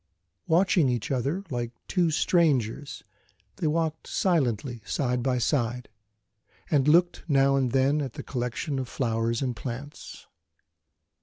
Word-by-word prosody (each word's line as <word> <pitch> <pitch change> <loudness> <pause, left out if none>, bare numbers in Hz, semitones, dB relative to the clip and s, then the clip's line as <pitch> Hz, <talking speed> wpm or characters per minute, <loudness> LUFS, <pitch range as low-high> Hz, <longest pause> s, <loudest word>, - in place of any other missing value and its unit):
Watching 170 -3 +3
each 120 -1 -2
other 140 +9 -1
like 120 -2 -2 0.2
two 175 -2 +2
strangers, 145 - +1 0.5
they 160 - -1
walked 160 0 -1
silently 125 - 0
side 125 +2 -1
by 125 0 0
side, 120 -1 -1 0.8
and 145 -3 +3
looked 175 +3 +3
now 135 -2 +4
and 130 -3 +1
then 135 +3 +2
at 135 -4 -4
the - - -7
collection 130 +3 -3
of 130 - -3
flowers 115 -1 -1
and 125 -2 -2
plants. 135 +5 -8
135 Hz, 130 wpm, -27 LUFS, 120-155 Hz, 0.8 s, now